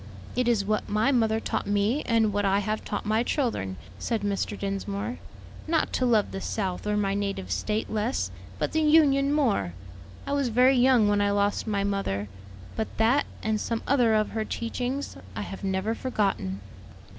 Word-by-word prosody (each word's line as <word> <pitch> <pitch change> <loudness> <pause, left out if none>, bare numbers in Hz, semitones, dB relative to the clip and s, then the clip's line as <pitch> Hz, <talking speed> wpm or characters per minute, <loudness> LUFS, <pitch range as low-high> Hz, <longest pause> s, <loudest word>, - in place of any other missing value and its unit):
"It 250 0 +1
is 225 -5 +2
what 215 0 -1
my 215 +6 +2
mother 225 -4 +2
taught - - -2
me, 205 +7 +1
and 225 -3 +3
what 205 0 0
I 195 0 +3
have 215 +2 -1
taught 205 - -4
my 215 +2 +2
children," 230 - -1 0.2
said 230 -3 -1
Mr. 200 0 -1
Dinsmore; 200 +4 -3 0.5
"not 320 0 +1
to 255 - +1
love 220 -4 +3
the 195 - -5
South 195 -2 -3
or 210 0 +1
my 195 -1 +1
native 195 - -3
State 210 - -1
less, 220 +4 -1 0.3
but - - -1
the 315 - +1
Union 290 -3 +4
more. 225 - +1 0.5
I 280 - -2
was 280 -2 +1
very 250 +3 +4
young 245 -3 +5
when 205 0 +2
I 205 - +2
lost 205 +2 +1
my 200 -2 0
mother; 150 - -1 0.5
but 220 - -1
that, 235 +6 +3 0.2
and 215 -1 0
some 230 -1 -2
other 245 -5 +3
of 215 0 +1
her 220 -1 -1
teachings, 245 - -3 0.2
I 105 - -3
have 195 - -8
never 190 +3 0
forgotten." 195 - -1
215 Hz, 180 wpm, -27 LUFS, 200-245 Hz, 0.5 s, young